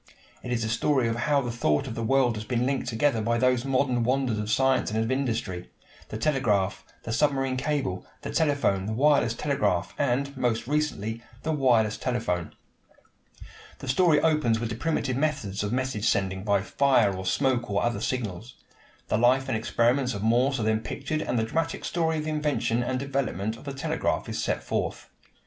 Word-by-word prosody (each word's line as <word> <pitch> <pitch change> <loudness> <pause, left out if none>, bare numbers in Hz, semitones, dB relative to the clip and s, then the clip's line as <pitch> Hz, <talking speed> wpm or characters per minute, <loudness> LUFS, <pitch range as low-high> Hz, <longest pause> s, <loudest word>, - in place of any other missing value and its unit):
It 125 - -6
is 120 -2 0
the - - -1
story 125 +2 +1
of 115 - -1
how 140 +4 +1
the 120 -2 -3
thought 75 -11 +1
of 125 - -5
the 115 - -4
world 125 0 +2
has 105 - -5
been 120 +2 -1
linked 135 -1 -1
together 120 0 +1
by 115 +2 +1
those 125 0 +2
modern 130 -2 +1
wonders 125 -2 +1
of 105 0 -3
science 130 +3 +2
and 110 +1 -1
of 115 - -2
industry 115 -9 -2 0.4
the 110 - -4
telegraph, 110 -8 +1 0.2
the 115 - -3
submarine 135 -2 +1
cable, 135 -9 -2 0.2
the - - -4
telephone, 140 -11 +1
the 110 - -2
wireless 135 -2 +3
telegraph, 105 -11 0
and, 140 +1 0
most 120 -3 0
recently, 120 -6 -1 0.2
the 160 - -1
wireless 120 -7 +2
telephone. 115 -9 -2 1.2
The - - -9
story 150 +3 +4
opens 150 -9 +2
with 115 0 -3
the 110 - -3
primitive 130 -1 -1
methods 135 -10 -1
of 105 - -2
message 130 -4 0
sending 95 -1 0
by 100 -2 +2
fire 120 -5 +3
or 95 - -5
smoke 120 +5 0
or 100 - 0
other 120 -3 -1
signals. 115 -2 -3 0.5
The - - +1
life 130 +3 +3
and 130 - 0
experiments 120 +3 +1
of 100 - -4
Morse 125 +4 +2
are - - -1
then 110 0 +2
pictured 145 +7 -3
and 125 - -1
the 110 - +2
dramatic 165 +8 -2
story 160 -2 0
of 155 - -2
the 155 - -3
invention 150 -6 0
and 130 +1 -1
development 130 -6 -2
of 115 - -14
the 140 - -4
telegraph 155 +4 -1
is - - -3
set - - -1
forth. - - -3
125 Hz, 190 wpm, -26 LUFS, 110-140 Hz, 1.2 s, story